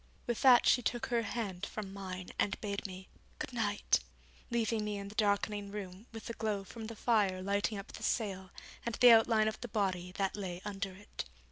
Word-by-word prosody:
With 240 Hz, -2 st, -1 dB
that 255 Hz, -3 st, +8 dB
she 245 Hz, -, +5 dB
took 240 Hz, 0 st, -1 dB
her 235 Hz, -1 st, +1 dB
hand 205 Hz, -6 st, -3 dB
from 200 Hz, -1 st, -5 dB
mine 185 Hz, -2 st, -6 dB
and 195 Hz, -, +1 dB
bade 200 Hz, -1 st, -3 dB
me 185 Hz, 0 st, -9 dB, 0.3 s
'good 300 Hz, -4 st, -5 dB
night', 205 Hz, -3 st, +2 dB, 0.5 s
leaving 230 Hz, -2 st, +1 dB
me 210 Hz, -1 st, -2 dB
in 200 Hz, 0 st, -6 dB
the -, -, -10 dB
darkening 205 Hz, -1 st, +1 dB
room 200 Hz, +1 st, -7 dB
with 225 Hz, -2 st, -8 dB
the 230 Hz, -, -4 dB
glow 215 Hz, -3 st, -1 dB
from 220 Hz, +3 st, -8 dB
the 230 Hz, -, -7 dB
fire 205 Hz, -5 st, +2 dB
lighting 200 Hz, +2 st, 0 dB
up 195 Hz, -, -7 dB
the -, -, -9 dB
sail 190 Hz, -4 st, -1 dB, 0.3 s
and 235 Hz, -2 st, -2 dB
the 245 Hz, -1 st, +8 dB
outline 225 Hz, -1 st, +6 dB
of 220 Hz, -, -3 dB
the 245 Hz, -, -4 dB
body 190 Hz, -5 st, -1 dB
that 195 Hz, 0 st, -1 dB
lay 185 Hz, -4 st, -4 dB
under 200 Hz, -2 st, -3 dB
it. 205 Hz, -, -7 dB
205 Hz, 205 wpm, -33 LUFS, 195-225 Hz, 0.5 s, that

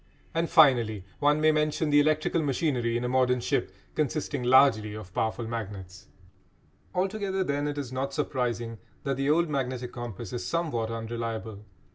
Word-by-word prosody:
And 165 Hz, 0 st, 0 dB
finally 120 Hz, -, +4 dB
one 150 Hz, +1 st, +3 dB
may 155 Hz, 0 st, +5 dB
mention 150 Hz, 0 st, 0 dB
the 145 Hz, -, +6 dB
electrical 155 Hz, +2 st, +2 dB
machinery 130 Hz, -5 st, 0 dB
in 120 Hz, -, -3 dB
a -, -, 0 dB
modern 125 Hz, 0 st, +2 dB
ship -, -, -1 dB, 0.2 s
consisting 150 Hz, -2 st, -1 dB
largely 120 Hz, -4 st, +4 dB
of 95 Hz, -4 st, -9 dB
powerful 110 Hz, +1 st, -1 dB
magnets. 100 Hz, -5 st, -6 dB, 0.9 s
Altogether, 190 Hz, 0 st, 0 dB
then, 145 Hz, -3 st, -1 dB
it 145 Hz, 0 st, -3 dB
is 135 Hz, -4 st, -4 dB
not 135 Hz, +1 st, -2 dB
surprising 120 Hz, -5 st, -2 dB, 0.2 s
that 140 Hz, -2 st, -1 dB
the 135 Hz, +1 st, 0 dB
old 170 Hz, +3 st, +3 dB
magnetic 130 Hz, -4 st, -3 dB
compass 120 Hz, -4 st, -6 dB
is 120 Hz, -, -3 dB
somewhat 150 Hz, -10 st, -1 dB
unreliable. 115 Hz, -2 st, -5 dB
130 Hz, 155 wpm, -28 LUFS, 115-150 Hz, 0.9 s, the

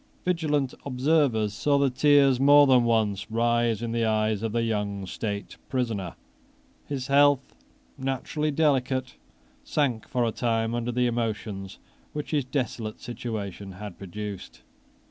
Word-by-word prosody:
Vigilant 150 Hz, -7 st, 0 dB
observers 130 Hz, -6 st, +1 dB
saw 140 Hz, +7 st, +2 dB
the 140 Hz, -2 st, +2 dB
tears 140 Hz, -1 st, +4 dB
more 145 Hz, +1 st, +7 dB
than 130 Hz, -3 st, +5 dB
once 110 Hz, -3 st, +1 dB
rise 115 Hz, 0 st, +1 dB
in 115 Hz, -, -2 dB
the 115 Hz, 0 st, 0 dB
eyes 110 Hz, -1 st, +1 dB
of 115 Hz, -1 st, -2 dB
the 115 Hz, +1 st, 0 dB
young 105 Hz, -3 st, -2 dB
state 100 Hz, +1 st, -5 dB
prisoner. 115 Hz, -9 st, -2 dB, 0.7 s
His 135 Hz, -3 st, -3 dB
health, 140 Hz, -1 st, +3 dB, 0.5 s
naturally 135 Hz, +3 st, -2 dB
delicate, 135 Hz, -4 st, +1 dB, 0.5 s
sank 130 Hz, -7 st, -1 dB
for 125 Hz, -1 st, 0 dB
a 115 Hz, -, 0 dB
time 115 Hz, -1 st, 0 dB
under 120 Hz, 0 st, -1 dB
the 125 Hz, +1 st, +1 dB
emotions 110 Hz, -5 st, -3 dB, 0.4 s
which 150 Hz, -1 st, -5 dB
his 145 Hz, -4 st, +1 dB
desolate 125 Hz, -5 st, -3 dB
situation 105 Hz, -5 st, -6 dB
had 100 Hz, 0 st, -9 dB
produced. 100 Hz, -9 st, -7 dB
120 Hz, 135 wpm, -26 LUFS, 110-135 Hz, 0.7 s, more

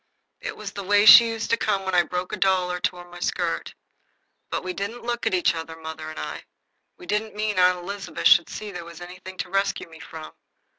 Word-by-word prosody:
It -, -, -6 dB
was 210 Hz, -2 st, -6 dB
the 200 Hz, -, -6 dB
way 205 Hz, +2 st, +4 dB
she 235 Hz, +1 st, +11 dB
used 225 Hz, -1 st, -4 dB
to 230 Hz, -, +4 dB
come 200 Hz, -4 st, 0 dB
when 190 Hz, -, -2 dB
I 175 Hz, -, +6 dB
broke 180 Hz, +1 st, -4 dB
my -, -, -4 dB
doll 185 Hz, -2 st, +2 dB
or 180 Hz, -, -3 dB
tore 180 Hz, 0 st, -2 dB
my 175 Hz, 0 st, -12 dB
skirt. -, -, -2 dB, 0.7 s
But -, -, -3 dB
we 185 Hz, 0 st, -3 dB
didn't 200 Hz, +6 st, -5 dB
look 240 Hz, 0 st, -2 dB
at -, -, 0 dB
each 180 Hz, -, +2 dB
other, 160 Hz, 0 st, -6 dB
mother 160 Hz, -1 st, -7 dB
and 155 Hz, -, -9 dB
I. -, -, -6 dB, 0.5 s
We 355 Hz, -, -12 dB
didn't 215 Hz, -5 st, -2 dB
mean 210 Hz, -2 st, -1 dB
Aunt 180 Hz, 0 st, +5 dB
Elizabeth 195 Hz, +3 st, -6 dB
should 170 Hz, -, +6 dB
see 210 Hz, -1 st, -6 dB
there 175 Hz, -3 st, -7 dB
was 170 Hz, 0 st, -11 dB
anything 180 Hz, +1 st, -10 dB
to -, -, -5 dB
rescue 195 Hz, -1 st, 0 dB
me 160 Hz, -1 st, -14 dB
from. 160 Hz, -1 st, -9 dB
185 Hz, 230 wpm, -24 LUFS, 175-205 Hz, 0.7 s, she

